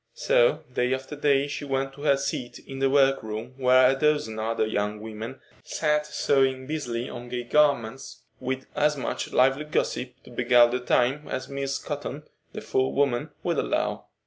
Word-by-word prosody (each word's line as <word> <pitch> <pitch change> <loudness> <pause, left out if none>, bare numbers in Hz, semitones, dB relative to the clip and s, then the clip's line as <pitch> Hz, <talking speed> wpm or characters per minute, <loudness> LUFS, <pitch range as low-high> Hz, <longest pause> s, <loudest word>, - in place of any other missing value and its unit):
So - - +3
day 125 +1 +1
after 130 +3 -8
day 140 -1 +2
she 145 - -5
went 135 -1 -2
to 140 - -12
her 140 -2 +3
seat 135 -3 -4
in 135 0 -9
the 135 0 +2
workroom 130 -4 +1
where 130 -1 +5
a 135 - +3
dozen 140 -6 +1
other 110 0 0
young 105 -1 -2
women 110 +4 -7 0.2
sat 150 -1 0
sewing 135 -3 +1
busily 125 -5 -3
on 120 0 -8
gay 125 0 -3
garments, 135 -2 +1 0.2
with 130 +1 -3
as 150 0 +2
much 135 - -3
lively 135 +4 +3
gossip 130 -4 -2
to - - -15
beguile 120 0 +5
the 125 +1 -1
time 125 +4 +1
as 130 0 -4
Miss 140 0 -2
Cotton, - - -5 0.3
the - - -7
forewoman, 130 -1 0
would - - 0
allow. - - -1
130 Hz, 170 wpm, -26 LUFS, 120-140 Hz, 0.3 s, where